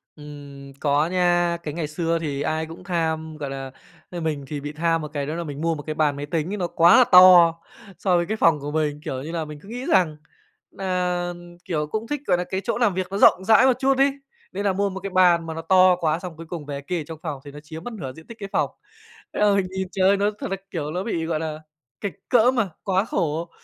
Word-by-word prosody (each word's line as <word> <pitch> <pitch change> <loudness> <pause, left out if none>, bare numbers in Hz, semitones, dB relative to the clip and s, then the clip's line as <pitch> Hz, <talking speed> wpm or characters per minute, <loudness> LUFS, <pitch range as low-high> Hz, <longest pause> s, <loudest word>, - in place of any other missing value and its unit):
Ừm, 145 -2 -11
có 145 +1 +2
nha, 175 -1 +2
cái 150 - -4
ngày 160 -1 -3
xưa 165 +2 -1
thì 145 -3 -3
ai 155 +2 -1
cũng 165 +3 -11
tham, 160 -3 -2
gọi 145 -2 -5
là, 135 -1 -6 0.4
ơ, 175 - -6
mình 155 -3 -2
thì 145 +1 -4
bị 145 +1 -5
tham 165 +1 0
một 155 - -5
cái, 145 -2 -2
đó 150 +3 -4
là 170 - -3
mình 145 -2 -7
mua 165 0 +1
một 150 - -7
cái 155 +1 -5
bàn 150 -2 +1
máy 145 +1 -5
tính 160 +3 -2
ấy - - -3
nó 180 -3 -1
quá 170 +4 +5
là 255 - +8
to 180 -2 +9 0.5
so 185 -3 +2
với 175 - +1
cái 220 +4 -3
phòng 165 -7 +4
của 145 +1 -5
mình, 150 -1 -1
kiểu 130 -1 -4
như 160 - -6
là, 165 -2 -3
mình 150 -1 -9
cứ 200 - -14
nghĩ 245 +3 -6
rằng 175 - +2 0.5
nà, 180 -2 -2 0.3
kiểu, 150 -3 -2
cũng 220 +7 -4
thích, 295 +1 -3
gọi 180 - +3
nà, 180 - -1
cái 190 +1 -4
chỗ 235 - -1
làm 235 -5 +2
việc 185 0 -2
nó 195 - -2
rộng 190 - +5
rãi 225 +4 +6
một 260 -2 +3
chút 270 0 +2
ấy, 275 +1 +4 0.4
nên 200 +2 -3
là 195 - +2
mua 200 +1 0
một 190 0 -6
cái 195 +1 -5
bàn 180 -3 +4
mà 165 - -5
nó 165 - -5
to 185 +2 +5
quá 160 -2 0
xong 175 -3 -8
cuối 165 - -9
cùng 165 -4 -6
về 140 -1 -5
kê 170 +4 -3
ở - - -6
trong 160 -2 -8
phòng 150 -5 -4
thì 145 - -9
nó 145 - -10
chiếm 160 +1 -9
mất 245 - -6
nửa 140 -12 -6
diện 160 +3 -15
tích 230 - -11
cái 200 -1 -6
phòng. - - +1 0.7
Thế - - -2
là 210 -1 +4
mình 195 -2 +1
nhìn 190 0 -3
trời 190 -1 +3
ơi, 200 - +4
nó 200 +1 +1
thật - - -5
ra, 195 - -1
kiểu, 150 -5 -3
ló 180 +4 -3
bị, 170 -7 -2
gọi 160 -2 -1
là, 155 -1 -4 0.4
kệch 200 - -3 0.2
cỡm, 245 +1 +4
à, 205 - 0 0.2
quá 190 0 +1
khổ, 165 -4 -2
170 Hz, 275 wpm, -23 LUFS, 155-190 Hz, 0.7 s, to